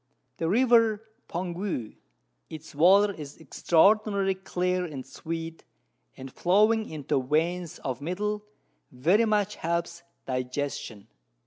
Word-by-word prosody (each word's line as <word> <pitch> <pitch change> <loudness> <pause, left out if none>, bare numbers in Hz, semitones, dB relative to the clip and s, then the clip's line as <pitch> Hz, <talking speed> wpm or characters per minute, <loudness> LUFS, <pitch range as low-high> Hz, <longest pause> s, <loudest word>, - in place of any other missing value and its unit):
The 165 - -1
River 230 -1 +4 0.2
Poangue, 175 - -4 0.5
its 160 0 -10
Water 195 +7 +5
is 145 -5 -9
extraordinary 195 +4 +2
clear 180 -1 -2
and 145 -7 -6
sweet, 165 0 -6 0.5
and 130 0 -9
flowing 215 +5 +3 0.2
thro' 135 - +1
Veins 165 +5 -1
of 130 0 -3
Metal, 210 +6 -2 0.5
very 175 - +3
much 210 -1 0
helps 170 +1 -2 0.2
Digestion. 125 -4 -4
175 Hz, 105 wpm, -27 LUFS, 150-205 Hz, 0.5 s, Water